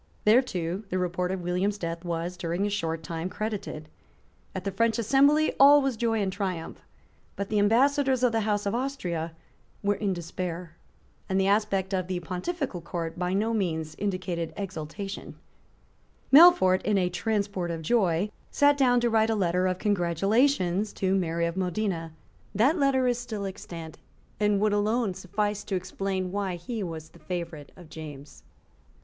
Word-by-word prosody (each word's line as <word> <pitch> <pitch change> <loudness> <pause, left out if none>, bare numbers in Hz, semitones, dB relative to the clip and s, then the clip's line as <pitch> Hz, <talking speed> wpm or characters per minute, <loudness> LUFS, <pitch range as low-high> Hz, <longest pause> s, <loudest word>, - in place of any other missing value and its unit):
There 220 +4 +7
too 185 -5 -3
the 185 - -1
report 180 0 -1
of 190 -1 -3
William's 185 +4 0
death 170 -2 -4
was, 170 +1 -3
during 175 +2 -2
a 205 - -1
short 165 -5 -2
time, 165 +2 -4
credited. 205 -8 -4 0.7
At 190 - -4
the 195 - -2
French 225 +3 +1 0.2
embassy 290 +3 +5
all 285 +2 +9
was 270 -3 0
joy 225 -1 0
and 190 -1 -2
triumph: 185 -4 -4 0.5
but 200 0 -4
the 210 - +1
Ambassadors 260 +4 +3
of 250 - +4
the 225 - +1
House 210 -1 0
of 200 - 0
Austria 180 -11 -3 0.5
were 205 0 +3
in 205 -1 -1
despair; 175 -1 -5 0.5
and 190 0 +1
the 190 - +2
aspect 200 -1 +1
of 185 -2 -1
the 185 -1 -2
Pontifical 185 - -4
Court 170 0 -5
by 180 0 -1
no 220 +3 +1
means 160 -7 -1
indicated 185 -5 -2
exultation, 195 +1 -6 1.0
Melfort, 290 - +8
in 210 -1 +1
a 180 -2 +2
transport 200 -1 -1
of 165 -1 -4
joy, 190 0 +1 0.2
sate 285 0 +4
down 245 -2 +4
to 240 - +2
write 220 0 +3
a 225 - +2
letter 180 -2 +1
of 185 -1 -1
congratulation 195 - +2
to 195 -3 -2
Mary 170 -3 0
of 170 0 -2
Modena. 180 -3 -2 0.4
That 270 - +3
letter 270 -2 +3
is 245 -1 +1
still 215 -4 -5
extant, 170 -5 -8 0.4
and 210 -1 +2
would 210 -1 +2
alone 210 0 +1
suffice 205 +3 -2
to 195 - -2
explain 185 0 -3
why 195 -2 -2
he 215 +6 -5
was 160 -4 -6
the - - -18
favourite 170 -5 -6
of 175 -3 -13
James. 150 -2 -10
190 Hz, 165 wpm, -27 LUFS, 175-220 Hz, 1.0 s, all